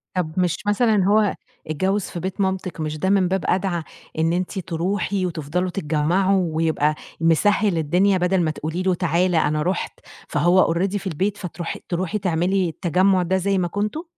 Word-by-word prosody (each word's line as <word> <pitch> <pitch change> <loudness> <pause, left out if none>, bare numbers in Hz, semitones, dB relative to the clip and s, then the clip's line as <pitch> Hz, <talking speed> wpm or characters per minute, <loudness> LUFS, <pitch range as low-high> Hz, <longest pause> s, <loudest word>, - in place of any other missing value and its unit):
طب 175 -4 -1
مش 175 -2 +1
مثلًا 210 -2 +3
هو 210 0 +3 0.3
اتجوّز 190 +7 0
في 175 - -6
بيت 190 +3 -4
مامتِك 190 -3 -2
مش 155 0 -3
ده 190 - 0
من 195 -2 +3
باب 190 +1 -1
أدعى 180 -3 0 0.4
إن 165 +1 +2
أنتِ 185 +2 -2
تروحي 185 +3 -1
وتفضلو 175 +1 -2
تتجمّعوا 175 +1 +1
ويبقى 155 -2 +1 0.3
مسهِّل 190 +3 +3
الدنيا 180 +5 +2
بدل 180 +1 +1
ما 160 - +1
تقولي 160 +4 -4
له 185 -1 +2
تعالَ 175 +1 +1
أنا 150 -1 +1
رُحت، 180 +3 -2 0.3
فهو 170 +2 +3
already 195 +4 0
في 195 - -6
البيت 190 +4 -1
فتروحي 175 -2 -5
تروحي 185 +3 -1
تعملي 180 0 +1
التجمُّع 180 +3 +2
ده 190 +2 +1
زي 195 +1 0
ما 180 -2 +1
كنتم؟ 210 - -3
180 Hz, 170 wpm, -22 LUFS, 165-195 Hz, 0.4 s, مثلًا